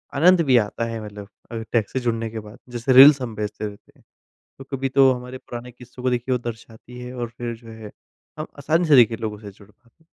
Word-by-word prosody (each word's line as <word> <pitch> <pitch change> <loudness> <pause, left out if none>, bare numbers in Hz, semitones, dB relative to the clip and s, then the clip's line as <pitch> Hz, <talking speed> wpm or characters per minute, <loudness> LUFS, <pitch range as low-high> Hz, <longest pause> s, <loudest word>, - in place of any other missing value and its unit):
आनंद 175 +5 +5
भी 130 -3 +5
आता 115 +1 -1
है 115 -1 -5
मतलब 105 -1 -9 0.2
अ, - - -6 0.2
टेक 115 -4 +1
से 130 - -2
जुड़ने 115 -2 -2
के 110 0 -6
बाद 105 +2 -12
जैसे 120 +2 0
रील्स 140 +2 +9
हम 115 -3 -5
भेजते 105 0 -4
रहते 100 -1 -13
हैं। - - -26 0.6
तो 135 - -10
कभी 135 +1 -2
तो 135 0 +5
हमारे 125 +1 -7
पुराने 125 0 -9
किस्सों 125 +1 -13
को 130 - +1
देखिए 125 +1 -1
वो - - 0
दर्शाती 115 +2 -13
है 125 +1 -8
और 120 -2 -4
फिर 120 -1 -4
जो 115 0 -16
है 110 -2 -10 0.5
हम 155 - -4
आसानी 160 +5 +1
से 145 - +7
देखिए 115 -2 +5
लोगों 110 -2 -4
से 105 -2 -9
जुड़ 100 +1 -19
पाते 120 +9 -31
120 Hz, 235 wpm, -22 LUFS, 110-130 Hz, 0.6 s, रील्स